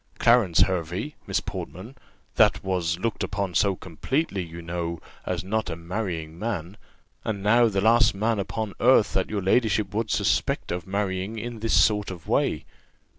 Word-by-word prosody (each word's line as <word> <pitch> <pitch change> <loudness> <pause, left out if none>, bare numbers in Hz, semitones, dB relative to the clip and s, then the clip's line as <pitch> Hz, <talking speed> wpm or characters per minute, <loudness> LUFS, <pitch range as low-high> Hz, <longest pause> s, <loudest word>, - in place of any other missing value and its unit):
Clarence 115 -8 +4
Hervey, 90 - 0
Miss - - 0
Portman, 95 +4 -7 0.4
that - - +4
was 90 -3 0
looked 115 +4 -2
upon 100 -3 -2
so 100 +1 +2
completely, 95 - -2
you 85 -1 -8
know, 85 0 -4 0.3
as - - -2
not 110 +1 -1
a 80 - -3
marrying 85 -2 -4
man; 95 -4 -3 0.5
and 100 -3 -3
now 115 +3 +5
the 100 -3 0
last 115 +1 +4
man 110 +2 0
upon 105 +1 -3
earth 120 -4 +4
that 95 - 0
your 105 -3 -2
ladyship 105 -1 +2
would 110 +1 -1
suspect 100 -6 0
of 85 0 -4
marrying 100 +1 -2
in 115 +1 -5
this 115 +1 +3
sort 105 -2 +3
of 90 -4 -9
way!" - - +1
100 Hz, 165 wpm, -25 LUFS, 90-110 Hz, 0.5 s, now